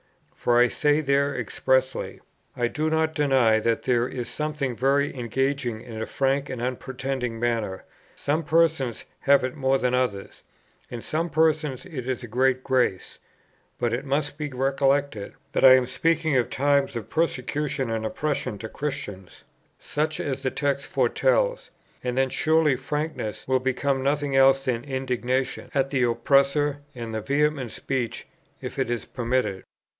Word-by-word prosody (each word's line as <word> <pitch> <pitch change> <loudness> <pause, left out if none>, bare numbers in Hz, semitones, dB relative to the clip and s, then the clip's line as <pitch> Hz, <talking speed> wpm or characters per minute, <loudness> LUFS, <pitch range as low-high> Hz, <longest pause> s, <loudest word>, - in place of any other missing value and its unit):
For 120 0 +1
I 120 0 +5
say 150 +3 +2
there 140 0 +1
expressly: 130 0 0 0.4
"I 120 -1 +2
do 155 +6 -1
not 160 0 +1
deny 135 -7 +3
that 115 +1 0
there 120 -1 +2
is 125 -2 -5
something 150 -4 -2
very 140 +4 +1
engaging 130 -1 -1
in 115 -2 -7
a - - -3
frank 135 +1 0
and 130 - -4
unpretending 130 -1 -3
manner; 115 -5 -1 0.3
some 150 +3 0
persons 155 -6 +1
have 140 -1 +4
it 130 0 -2
more 135 -2 +2
than 125 -1 0
others; 125 -6 -1 0.5
in 120 -2 -7
some 165 +2 -1
persons 155 -3 +1
it 135 -9 -6
is 130 -1 -2
a - - -6
great 130 +3 +1
grace. 125 -8 0 0.6
But 120 -1 0
it 120 - -1
must 145 +1 -1
be 150 -1 -2
recollected 135 -3 0 0.2
that - - 0
I 130 -1 +10
am 130 -1 +3
speaking 160 +4 +1
of 125 -2 +2
times 140 -1 +1
of 115 - -5
persecution 145 -4 -1
and 110 -1 -2
oppression 135 -1 -2
to 110 +2 -7
Christians, 130 - -6 0.3
such 155 +1 -2
as 135 -1 -3
the 135 - 0
text 140 0 -1
foretells; - - +1 0.3
and 125 0 -2
then 135 0 +3
surely 155 -3 +3
frankness 150 -4 -4
will 130 0 +3
become 130 +1 0
nothing 140 0 0
else 135 0 +5
than 120 -2 -1
indignation 130 -1 -2
at 135 0 +1
the 135 -3 +1
oppressor, 140 +4 +2 0.2
and 115 -2 -5
vehement 140 -3 0
speech, 130 -4 -3 0.3
if - - -6
it 130 -3 0
is 120 -1 -2
permitted. 120 -6 -1
135 Hz, 155 wpm, -25 LUFS, 125-145 Hz, 0.6 s, I